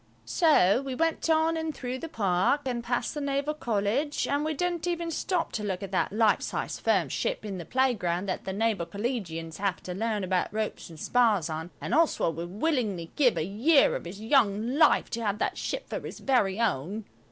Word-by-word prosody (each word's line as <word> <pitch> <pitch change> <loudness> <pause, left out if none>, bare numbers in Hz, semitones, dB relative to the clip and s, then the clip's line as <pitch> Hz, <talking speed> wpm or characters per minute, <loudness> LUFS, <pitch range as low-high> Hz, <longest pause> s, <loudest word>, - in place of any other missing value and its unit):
So 260 - +4
we 270 -2 -4
went 330 +2 0
on 320 +1 +3
and 320 -2 -3
through 255 0 -4
the 330 - -6
Park 195 - +1
and 245 -2 -2
past 245 0 -1
the 295 - -4
Naval 280 +1 -1
College, 240 +3 -1
and 285 +1 0
we 310 0 -1
didn't 350 +2 -1
even 340 -1 -2
stop 350 +2 -1
to 215 - -3
look 190 -2 -3
at 195 - -6
that - - 0
life 215 0 +3
sized - - -3
firm - - +2
ship - - -2
in 195 -3 -4
the 170 - -7
playground 205 -9 0
that 185 - -3
the 190 - -4
Naval 205 -4 0
Collegians 175 -6 -4
have 200 -1 -2
to 180 - -5
learn 215 +1 -1
about 185 -1 0
ropes 215 -3 -3
and 160 -2 -11
spars 215 -9 +2
on, 160 +2 -4
and - - -4
Oswald 305 - +2
would 170 +1 -4
willingly 210 - -1
give 255 -5 +3
a 155 - 0
year 260 - +4
of - - -5
his 185 +4 -8
young 220 -1 +2
life 315 - +4
to 235 - -3
have 205 -1 0
that - - -1
ship - - -3
for - - -3
his - - -8
very 215 -7 +1
own. 205 - -1
225 Hz, 210 wpm, -28 LUFS, 195-285 Hz, -, So